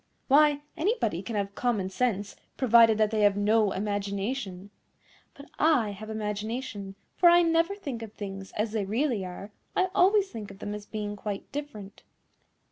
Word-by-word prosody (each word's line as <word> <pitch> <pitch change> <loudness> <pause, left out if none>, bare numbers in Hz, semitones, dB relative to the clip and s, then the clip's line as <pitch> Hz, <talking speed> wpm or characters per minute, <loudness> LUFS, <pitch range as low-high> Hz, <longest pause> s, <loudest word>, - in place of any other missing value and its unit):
Why, 290 +1 +4
anybody 320 - 0
can 215 +3 -6
have 200 -1 -2
common 210 -6 -1
sense, 205 -3 -1 0.2
provided 230 -3 +6
that 215 -1 +2
they 215 -1 0
have 205 -1 +4
no 210 0 +3
imagination. 200 0 -3 0.6
But 280 +1 -14
I 275 -10 +3
have 215 +2 -9
imagination, 210 -1 -4 0.2
for 350 - +7
I 345 0 +6
never 335 +3 +2
think 280 - -6
of 225 -2 -7
things 195 -2 -7
as 215 +1 -1
they 215 -2 -1
really 230 0 0
are; 185 +3 -8 0.2
I 375 0 +2
always 390 +1 +4
think 215 -3 -7
of 195 - -11
them 205 - -5
as 210 0 -8
being 210 -1 -4
quite 205 -1 -6
different. 220 -9 -7
215 Hz, 165 wpm, -28 LUFS, 200-270 Hz, 0.6 s, for